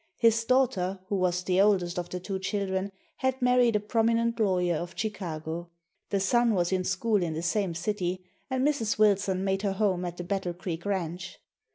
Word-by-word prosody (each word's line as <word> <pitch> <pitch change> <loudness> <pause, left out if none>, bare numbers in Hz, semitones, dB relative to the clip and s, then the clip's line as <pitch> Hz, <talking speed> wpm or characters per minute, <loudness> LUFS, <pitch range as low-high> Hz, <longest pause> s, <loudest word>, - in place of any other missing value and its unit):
His 230 -1 +4
daughter, 200 -8 +2
who 205 - 0
was 180 -1 +1
the 185 +1 +3
oldest 185 -3 +2
of 175 - -5
the 180 - -4
two 190 +1 -4
children, 195 0 -2 0.3
had 260 0 0
married 250 -2 +4
a - - +4
prominent 230 +2 +1
lawyer 180 -5 +2
of 175 +2 -5
Chicago. 170 -5 -4 0.4
The 200 - +1
son 235 +3 +3
was 175 -1 +1
in 185 -1 +1
school 195 +3 +1
in 165 -3 -2
the 160 - -3
same 180 -1 0
city, 180 0 -2 0.2
and 260 +1 +1
Mrs. 235 -8 0
Wilson 200 -3 +3
made 195 0 0
her 200 -2 0
home 190 -3 +1
at 175 0 -5
the 175 - -4
Battle 180 -1 -2
Creek 175 0 -5
ranch. 180 -2 -3
195 Hz, 190 wpm, -28 LUFS, 180-215 Hz, 0.4 s, His